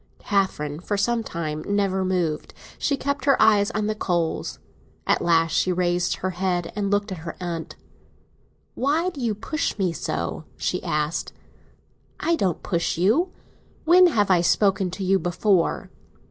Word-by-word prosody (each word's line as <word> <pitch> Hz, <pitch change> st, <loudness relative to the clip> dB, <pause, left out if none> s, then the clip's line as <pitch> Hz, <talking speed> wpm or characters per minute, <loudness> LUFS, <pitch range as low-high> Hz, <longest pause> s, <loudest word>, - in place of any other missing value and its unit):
Catherine 155 Hz, -7 st, -1 dB
for 205 Hz, +3 st, -2 dB
some 235 Hz, +3 st, +1 dB
time 155 Hz, -5 st, -4 dB
never 195 Hz, -2 st, +1 dB
moved; 175 Hz, -5 st, -1 dB, 0.2 s
she 280 Hz, -, 0 dB
kept 280 Hz, +1 st, -2 dB
her 275 Hz, -1 st, +4 dB
eyes 210 Hz, -2 st, +5 dB
on 210 Hz, 0 st, -2 dB
the 215 Hz, -, 0 dB
coals. 175 Hz, -6 st, -1 dB, 0.5 s
At -, -, +2 dB
last 165 Hz, -1 st, +3 dB
she 185 Hz, -, +2 dB
raised 175 Hz, 0 st, +1 dB
her 185 Hz, -, -3 dB
head 180 Hz, -1 st, -2 dB
and 205 Hz, -1 st, -1 dB
looked 205 Hz, +1 st, 0 dB
at 185 Hz, -, -5 dB
her 165 Hz, +1 st, -7 dB
aunt. 170 Hz, -2 st, -5 dB, 1.0 s
"Why 315 Hz, +7 st, +1 dB
do 290 Hz, -6 st, -8 dB
you 225 Hz, -3 st, 0 dB
push 305 Hz, +8 st, -2 dB
me 185 Hz, -4 st, 0 dB
so?" -, -, -3 dB
she -, -, -1 dB
asked. 150 Hz, +2 st, -2 dB, 0.9 s
"I 335 Hz, -, +2 dB
don't 185 Hz, -, -1 dB
push 170 Hz, -3 st, -1 dB
you. 240 Hz, -, +2 dB, 0.5 s
When 360 Hz, +2 st, +7 dB
have 205 Hz, -, +2 dB
I 175 Hz, -2 st, +5 dB
spoken 195 Hz, +1 st, +2 dB
to 190 Hz, +2 st, -5 dB
you 190 Hz, +1 st, +3 dB
before?" 180 Hz, 0 st, +1 dB
190 Hz, 160 wpm, -24 LUFS, 175-215 Hz, 1.0 s, When